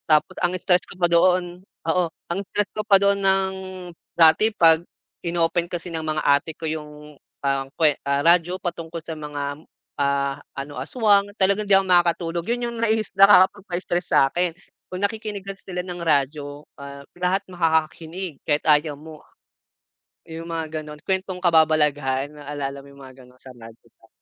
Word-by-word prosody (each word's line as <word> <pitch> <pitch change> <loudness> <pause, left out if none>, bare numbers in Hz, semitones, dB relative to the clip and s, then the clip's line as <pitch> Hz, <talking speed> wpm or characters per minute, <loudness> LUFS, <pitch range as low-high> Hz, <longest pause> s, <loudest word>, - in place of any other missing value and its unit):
Tapos 155 -1 +3
ang 180 0 +1
stress 180 0 +2
ko - - -11
pa 175 -1 +2
doon, 175 +1 +2 0.3
oo, 180 +2 +2 0.3
ang 175 - -1
stress 210 -1 0
ko 215 - -2
pa 200 -2 +6
doon 200 0 +2
ng 190 0 +2 0.6
dati 165 +6 +6
'pag 165 -4 +6 0.4
in-open 170 0 0
kasi 175 -1 -5
ng 160 - -2
mga 155 -1 -1
ate 140 +3 +2
ko 165 - -6
yung, 150 -1 -6 0.3
ang 135 -1 -1
kwe 150 -2 +2
ah 140 0 +1
radyo 175 +2 +3
patungkol 170 -1 -5
sa 165 - -5
mga, 145 -1 -5 0.4
ah, 140 0 0 0.2
ano 140 +1 -6
aswang 205 -4 +2
talagang 200 +2 +2
hindi 200 - +3
ako 195 - +1
makakatulog, 170 -1 +2
yun 240 0 0
yung 235 - -7
naiis 220 -2 +1
nakakapagpa-stress 185 -2 +4
sa'kin. 170 +6 +2 0.4
Kung 185 +1 -6
nakikinig 205 -1 -3
kasi 195 0 -7
sila 180 -1 -4
ng 175 -1 -6
radyo, 145 -1 -1 0.2
ah, 140 0 -10
lahat 185 +2 0
makakakinig 165 -1 -2
kahit 150 -1 0
ayaw 150 -1 +2
mo. 155 +1 -12 1.1
Yung 165 +1 -8
mga 160 -1 -4
gano'n 150 0 -10
kwentong 190 -1 -1
kababalagahan 150 -5 +2
naalala 140 -1 -6
mo - - -17
yung 140 - -17
mga 130 0 -14
gano'n 125 0 -20
sa 130 0 -13
madre 115 -1 -15
pa. - - -25
165 Hz, 165 wpm, -23 LUFS, 150-185 Hz, 1.1 s, pa